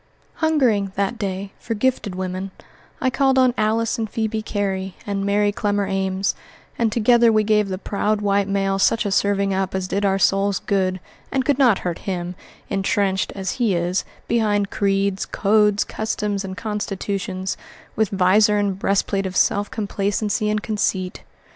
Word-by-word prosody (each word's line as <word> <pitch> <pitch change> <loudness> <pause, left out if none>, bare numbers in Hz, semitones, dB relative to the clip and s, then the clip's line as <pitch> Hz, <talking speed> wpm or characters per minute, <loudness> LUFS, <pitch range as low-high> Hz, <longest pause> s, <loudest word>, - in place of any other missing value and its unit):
Hungering, 245 - +2
that 200 +4 -1
day, 195 -1 -4
for 230 - -3
gifted 215 -4 0
women, 185 +1 -4 0.5
I 260 - +1
called 265 0 +2
on 255 -1 +4
Alice 225 +1 0
and 220 -1 -2
Phebe 220 +1 -2
Cary 195 -3 -2
and 200 -1 -2
Mary 205 +1 +2
Clemmer 205 -1 0
Ames, 195 0 0 0.4
and 230 -2 +1
together 235 +1 +4
we 215 -1 +3
gave 210 -1 +2
the 185 - -2
proud 210 +2 -1
white 200 -1 +1
male 195 -1 0
such 225 +3 +3
a 200 - -1
serving 200 0 +1
up 190 0 -1
as 190 -1 -2
did 200 +2 -1
our 195 -1 +2
souls 195 +1 +2
good 185 -2 0 0.3
and 265 -1 0
could 285 -2 +1
not 245 -7 +5
hurt 175 -2 -2
him, 175 -1 -3 0.3
intrenched, 195 -1 0
as 190 -2 -2
he 235 -7 +1
is, 175 +2 0 0.2
behind 210 -3 +1
creeds, 195 -1 0
codes, 210 0 +3
customs, 210 -2 -2
and 190 0 -6
constitutions, 195 -3 -3 0.4
with 220 -2 +1
vizor 205 +2 +4
and 200 -2 0
breastplate 195 0 0
of 185 - -7
self 205 0 +2
complacency 205 0 -1
and 210 0 -1
conceit. 190 -4 -1
200 Hz, 160 wpm, -22 LUFS, 195-215 Hz, 0.5 s, not